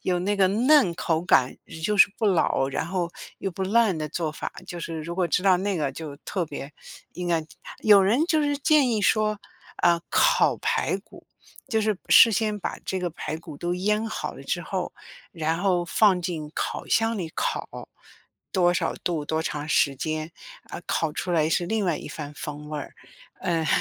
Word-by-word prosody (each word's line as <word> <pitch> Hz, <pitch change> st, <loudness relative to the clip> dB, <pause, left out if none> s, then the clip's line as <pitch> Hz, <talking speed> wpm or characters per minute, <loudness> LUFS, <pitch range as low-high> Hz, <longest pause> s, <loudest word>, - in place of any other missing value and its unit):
有 180 Hz, -1 st, +1 dB
那 200 Hz, +3 st, 0 dB
个 195 Hz, -, +4 dB
嫩 240 Hz, -, +4 dB
口 165 Hz, -2 st, -1 dB
感 130 Hz, -7 st, +3 dB
也 160 Hz, -, -10 dB
就 210 Hz, +6 st, 0 dB
是 200 Hz, -, +7 dB
不 220 Hz, -, +1 dB
老， 165 Hz, -8 st, +2 dB
然 160 Hz, -, -2 dB
后 175 Hz, -1 st, -2 dB, 0.3 s
又 195 Hz, -, -3 dB
不 190 Hz, +2 st, -5 dB
烂 210 Hz, -1 st, +3 dB
的 155 Hz, -1 st, -3 dB
做 155 Hz, +1 st, -2 dB
法， 155 Hz, -, -6 dB
就 175 Hz, -, -7 dB
是 165 Hz, -1 st, -5 dB
如 170 Hz, +2 st, -5 dB
果 180 Hz, -1 st, +1 dB
知 175 Hz, +2 st, 0 dB
道 190 Hz, -2 st, +5 dB
那 195 Hz, +1 st, -1 dB
个 145 Hz, -3 st, 0 dB
就 155 Hz, -1 st, -7 dB
特 185 Hz, +1 st, -3 dB
别 145 Hz, -1 st, -7 dB, 0.4 s
应 180 Hz, 0 st, -4 dB
该。 165 Hz, -2 st, +1 dB, 0.3 s
有 205 Hz, -2 st, +6 dB
人 235 Hz, +11 st, +3 dB
就 315 Hz, -3 st, +2 dB
是 290 Hz, -1 st, 0 dB
建 290 Hz, -3 st, +4 dB
议 220 Hz, -2 st, +1 dB
说， 215 Hz, +1 st, +2 dB, 0.4 s
呃， 170 Hz, -1 st, +5 dB
烤 -, -, +3 dB
排 -, -, 0 dB
骨， -, -, -17 dB, 0.4 s
就 220 Hz, -3 st, +1 dB
是 215 Hz, -1 st, +1 dB
事 230 Hz, -, +8 dB
先 215 Hz, 0 st, 0 dB
把 -, -, -4 dB
这 190 Hz, -, -2 dB
个 180 Hz, -1 st, -1 dB
排 155 Hz, -1 st, -5 dB
骨 160 Hz, -3 st, -10 dB
都 175 Hz, +3 st, -2 dB
腌 210 Hz, +4 st, 0 dB
好 215 Hz, -, -4 dB
了 -, -, -11 dB
之 -, -, -2 dB
后， -, -, -4 dB, 0.4 s
然 160 Hz, -1 st, -1 dB
后 180 Hz, -2 st, +1 dB
放 195 Hz, -1 st, +3 dB
进 165 Hz, -4 st, -4 dB
烤 -, -, -3 dB
箱 225 Hz, 0 st, +2 dB
里 165 Hz, -3 st, -4 dB
烤， -, -, -3 dB, 0.6 s
多 175 Hz, -2 st, +3 dB
少 -, -, 0 dB
度、 160 Hz, -4 st, -2 dB
多 160 Hz, +1 st, -1 dB
长 150 Hz, 0 st, -4 dB
时 140 Hz, -2 st, +3 dB
间， 155 Hz, +3 st, -3 dB, 0.3 s
啊， -, -, -8 dB
烤 160 Hz, -2 st, 0 dB
出 180 Hz, -, -4 dB
来 155 Hz, -2 st, +2 dB
是 175 Hz, +2 st, 0 dB
另 220 Hz, +2 st, 0 dB
外 170 Hz, -4 st, +1 dB
一 -, -, -8 dB
番 150 Hz, -1 st, -7 dB
风 150 Hz, 0 st, -7 dB
味 150 Hz, -, -3 dB
儿。 145 Hz, -, -8 dB, 0.5 s
嗯。 165 Hz, -3 st, 0 dB
175 Hz, 215 characters per minute, -25 LUFS, 160-205 Hz, 0.6 s, 事